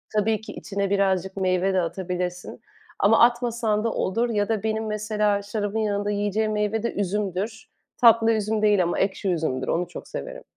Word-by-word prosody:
Tabii 215 +1 +1
ki 220 - -9
içine 200 -1 -3
birazcık 190 -1 0
meyve 185 0 +1
de 185 - +2
atabilirsin 180 0 -4 0.4
ama 215 +3 +4
atmasan 235 -3 +2
da 230 - 0
olur 230 +6 0
ya 205 -2 0
da 220 -3 -1
benim, 220 0 -1
mesela, 210 -1 0
şarabın 205 +1 -3
yanında 205 -1 -1
yiyeceğim 205 +1 0
meyve 210 +1 -1
de 235 - -1
üzümdür. 205 +2 -3 0.3
Tatlı 230 -1 +6
üzüm 215 0 0
değil 210 -3 +4
ama 175 - -1
ekşi 195 0 0
üzümdür, 155 -7 -1
onu 175 +1 0
çok 175 - -9
severim. - - -7
205 Hz, 170 wpm, -24 LUFS, 190-220 Hz, 0.4 s, Tatlı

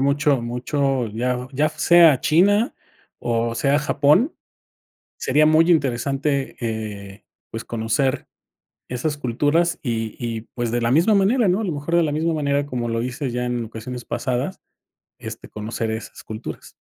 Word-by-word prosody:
mucho, 140 0 +2
mucho, 125 +1 -1
ya, 125 +3 -2
ya 145 +3 +2
sea 160 -2 +5
China 205 - +3 0.5
o 115 0 0
sea 140 +4 +2
Japón, 150 - +3 0.8
sería 150 +4 +3
muy 160 +2 +5
interesante, 140 -1 0
eh, 105 -3 -5 0.3
pues, 115 0 -6
conocer 115 +4 -1 0.6
esas 135 +5 -2
culturas 145 +6 +1
y 115 -5 -3
y, 115 -2 -4
pues, 120 -2 -2
de 120 +1 0
la 115 - +1
misma 170 - +4
manera, 205 +3 +3
¿no? 185 +5 +2
A - - -2
lo 180 - -1
mejor 145 +4 -1
de 170 - +4
la 150 -3 0
misma 160 +2 0
manera, 145 -1 0
como 125 -4 -3
lo 115 0 -1
dices 130 +2 -3
ya 125 +1 -2
en 120 -1 -2
ocasiones 120 +2 -7
pasadas, 130 +7 -2 0.6
este, - - -8
conocer 110 +1 -4
esas 110 0 -6
culturas. 110 0 -8
135 Hz, 155 wpm, -22 LUFS, 120-155 Hz, 0.8 s, sea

